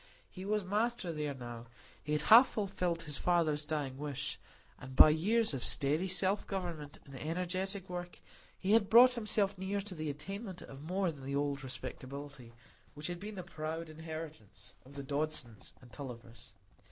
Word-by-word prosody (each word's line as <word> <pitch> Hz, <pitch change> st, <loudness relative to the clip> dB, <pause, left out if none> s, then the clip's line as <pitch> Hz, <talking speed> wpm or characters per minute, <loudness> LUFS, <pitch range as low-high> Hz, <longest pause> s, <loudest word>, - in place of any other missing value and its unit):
He 185 Hz, 0 st, -8 dB
was 210 Hz, -1 st, 0 dB
master 210 Hz, -1 st, 0 dB
there 150 Hz, -2 st, -2 dB
now; 120 Hz, -2 st, -8 dB, 0.4 s
he 150 Hz, -, -2 dB
had 150 Hz, -, +1 dB
half 235 Hz, +4 st, +9 dB
fulfilled 180 Hz, -5 st, -1 dB
his 150 Hz, -3 st, -1 dB
father's 160 Hz, -4 st, +2 dB
dying 145 Hz, -4 st, -2 dB
wish, 145 Hz, -2 st, -3 dB, 0.4 s
and 130 Hz, +1 st, -9 dB
by 155 Hz, -, +10 dB
years 215 Hz, +6 st, +2 dB
of 130 Hz, -, -3 dB
steady 150 Hz, +7 st, +2 dB
self 190 Hz, +2 st, +1 dB
government 170 Hz, -7 st, -4 dB
and 140 Hz, -, -13 dB
energetic 180 Hz, +6 st, -2 dB
work 175 Hz, 0 st, -6 dB, 0.4 s
he 190 Hz, -, -1 dB
had 215 Hz, -2 st, +5 dB
brought 245 Hz, +2 st, +9 dB
himself 205 Hz, -4 st, 0 dB
near 195 Hz, +2 st, -1 dB
to 200 Hz, -1 st, -7 dB
the 155 Hz, -3 st, -3 dB
attainment 190 Hz, +6 st, -6 dB
of 135 Hz, 0 st, -10 dB
more 180 Hz, +3 st, 0 dB
than 140 Hz, -4 st, -11 dB
the 140 Hz, +1 st, -3 dB
old 140 Hz, -1 st, 0 dB
respectability 130 Hz, 0 st, -7 dB, 0.4 s
which 150 Hz, +1 st, -7 dB
had 175 Hz, 0 st, -3 dB
been 210 Hz, +2 st, -6 dB
the 185 Hz, -, -5 dB
proud 160 Hz, -1 st, -5 dB
inheritance 155 Hz, -, -8 dB
of 140 Hz, +2 st, -14 dB
the 140 Hz, -, -5 dB
Dodsons 140 Hz, -6 st, -2 dB
and 120 Hz, -, -16 dB
Tullivers. 120 Hz, -4 st, -9 dB
160 Hz, 170 wpm, -34 LUFS, 140-190 Hz, 0.4 s, by